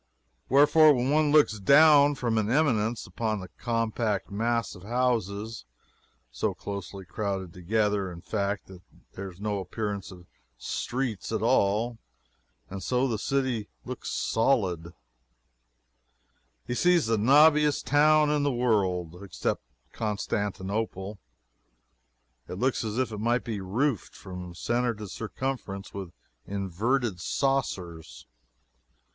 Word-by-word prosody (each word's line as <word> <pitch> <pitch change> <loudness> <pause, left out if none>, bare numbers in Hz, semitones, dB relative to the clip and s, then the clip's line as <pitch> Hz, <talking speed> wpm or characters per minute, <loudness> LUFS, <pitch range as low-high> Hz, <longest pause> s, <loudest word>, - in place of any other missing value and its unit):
Wherefore, 150 +2 +6
when 125 +2 0
one 150 0 +3
looks 145 -8 +4
down 145 +5 +6
from 115 -4 0
an 105 -1 -1
eminence, 120 -5 +1
upon 110 -2 -2
the 90 -1 -9
compact 115 -3 -2
mass 115 +1 -1
of 90 - -12
houses 110 - -1 0.7
(so 65 - -2
closely 100 -1 -7
crowded 95 -2 -4
together, 100 +1 0
in 85 -1 -10
fact, 100 0 -2
that 95 -2 -13 0.3
there 95 0 -6
is 90 0 -15
no 105 -1 -2
appearance 100 +1 -4
of 90 -2 -12 0.3
streets 120 - -3
at - - -1
all, 110 +4 +2 0.7
and 95 0 -7
so 125 +4 +1
the 110 -4 -2
city 130 -5 -1 0.2
looks - - -6
solid,) 95 -9 0 1.7
he 120 - -3
sees 175 +5 +3
the 110 -1 +1
knobbiest 150 +4 +5
town 150 +1 +4
in 150 -1 +1
the 145 0 +1
world, 95 -8 0
except 100 - -3 0.3
Constantinople. 105 -1 -3 1.3
It - - -5
looks 130 +4 0
as 110 0 -3
if 130 -2 0
it 105 - -5
might 120 +3 +1
be 110 -4 -4
roofed, 115 +5 -1
from 90 -2 -8
centre 120 +4 0
to 105 0 -7
circumference, 115 -2 -5
with 95 -3 -6 0.4
inverted 100 +3 -1
saucers. 90 - -2
110 Hz, 125 wpm, -27 LUFS, 95-130 Hz, 1.7 s, Wherefore